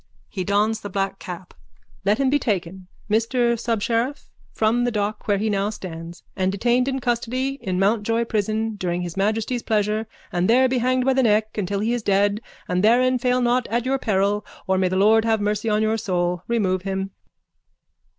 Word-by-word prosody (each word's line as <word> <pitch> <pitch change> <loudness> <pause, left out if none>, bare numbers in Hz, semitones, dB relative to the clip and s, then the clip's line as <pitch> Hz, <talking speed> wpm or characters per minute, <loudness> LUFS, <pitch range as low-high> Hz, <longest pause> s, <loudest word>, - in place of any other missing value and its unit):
(He 190 - -4
dons 210 +3 +1
the 205 - -6
black 195 0 -2
cap.) 180 0 -8 0.5
Let 205 +2 +2
him 270 -1 +1
be 290 - +3
taken, 190 -5 -3 0.2
Mr 235 +3 +2
Subsheriff, 230 +3 -1 0.2
from 225 +2 +1
the 245 - +2
dock 210 -1 -3
where 205 -1 +3
he 215 +3 -1
now 200 -1 0
stands 170 -5 -8
and 190 0 0
detained 240 +5 +1
in 270 -1 -1
custody 255 +3 -1
in 185 -1 -2
Mountjoy 225 +4 +1
prison 220 0 -1
during 180 -2 -2
His 175 -2 -6
Majesty's 220 +5 0
pleasure 215 0 0 0.2
and 180 +2 0
there 255 +3 +5
be 255 0 0
hanged 255 +1 +1
by 265 - +3
the 265 - +3
neck 215 -2 +2
until 200 -1 -2
he 225 +3 0
is 240 - -1
dead 205 +1 +2 0.3
and 180 +1 0
therein 250 +3 +4
fail 250 +1 +1
not 245 0 +1
at 235 +2 -1
your 270 +1 0
peril 205 -2 +1 0.2
or 190 0 +1
may 185 - +2
the 185 - -1
Lord 215 +3 +5
have 225 -1 +2
mercy 210 +2 -1
on 210 0 +2
your 220 +1 +1
soul. 175 -3 -1
Remove 195 -6 +1
him. 195 0 -3
215 Hz, 190 wpm, -23 LUFS, 195-235 Hz, 0.5 s, there